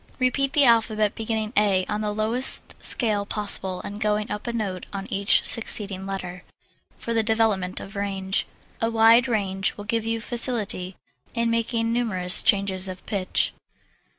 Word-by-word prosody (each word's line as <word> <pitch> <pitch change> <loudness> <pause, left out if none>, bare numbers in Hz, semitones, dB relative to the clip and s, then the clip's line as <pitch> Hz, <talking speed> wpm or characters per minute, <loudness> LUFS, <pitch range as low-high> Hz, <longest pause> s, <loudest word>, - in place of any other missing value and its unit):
Repeat 270 +1 0
the 290 -2 +4
alphabet, 220 -3 +2
beginning 220 -1 -4
A 195 -3 +2
on 210 0 -4
the 210 -1 -2
lowest 220 +5 +2
scale 215 -4 +3
possible 200 -3 -1
and 205 +1 -8
going 210 0 -1
up 210 +3 -6
a - - -1
note 200 -6 -5
on 195 -1 -6
each 200 +1 +2
succeeding 200 -4 +2
letter, 180 -2 -7 0.5
for 230 - -5
the 225 - +2
development 220 -4 0
of 195 - -11
range. 195 -1 -2 0.3
A 225 - 0
wide 230 +2 +4
range 195 -4 -2
will 205 - -9
give 225 +1 -2
you 225 0 -2
facility 220 -6 +2 0.4
in 235 0 0
making 230 0 -1
numerous 185 -7 +3
changes 195 -2 +1
of 185 0 -9
pitch. 195 -3 0
210 Hz, 155 wpm, -23 LUFS, 195-230 Hz, 0.5 s, the